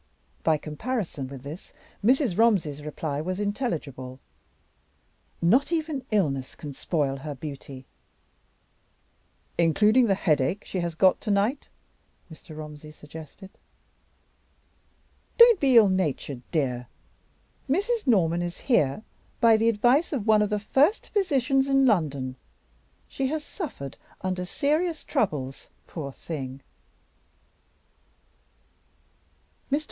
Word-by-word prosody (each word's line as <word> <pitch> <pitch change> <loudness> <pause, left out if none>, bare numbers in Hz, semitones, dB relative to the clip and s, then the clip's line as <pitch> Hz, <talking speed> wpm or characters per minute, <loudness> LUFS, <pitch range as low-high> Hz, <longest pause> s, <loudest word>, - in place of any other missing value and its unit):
By 160 -1 +3
comparison 160 - -4
with 135 -1 -10
this, 150 +6 -9 0.3
Mrs. 250 - +3
Romsey's 185 -10 +2
reply 150 -1 -4
was 185 +4 -3
intelligible. 155 - -3 1.2
"Not 245 - +4
even 310 -5 -2
illness 140 - 0
can 145 -2 -8
spoil 140 -2 -1
her 145 +1 -6
beauty!" 135 -2 -8 1.7
"Including 210 +9 +4
the 195 - +3
headache 165 +1 +1
she 185 - -3
has 170 -2 -2
got 185 +2 +4
to - - -4
night?" 210 +8 +1 0.7
Mr. 155 0 -12
Romsey 150 0 -9
suggested. 155 +5 -12 1.9
"Don't 470 -4 +8
be 265 -4 +5
ill 220 -3 +8
natured, 155 -8 -1
dear! 125 -6 -1 0.8
Mrs. 410 - 0
Norman 175 -7 +3
is 175 0 -4
here 215 - +1 0.4
by 230 -1 +6
the 225 +1 +3
advice 245 +9 +3
of 255 -9 -2
one 215 -1 +5
of 210 - +1
the 210 - 0
first 280 - +2
physicians 275 - +2
in 270 0 +4
London; 140 - +1 0.7
she 270 - -2
has 305 +2 -2
suffered 250 - -7 0.2
under 185 -1 -2
serious 310 - 0
troubles, 150 - -2 0.2
poor 145 -5 -6
thing." 135 -3 -7
185 Hz, 110 wpm, -26 LUFS, -, 1.9 s, Don't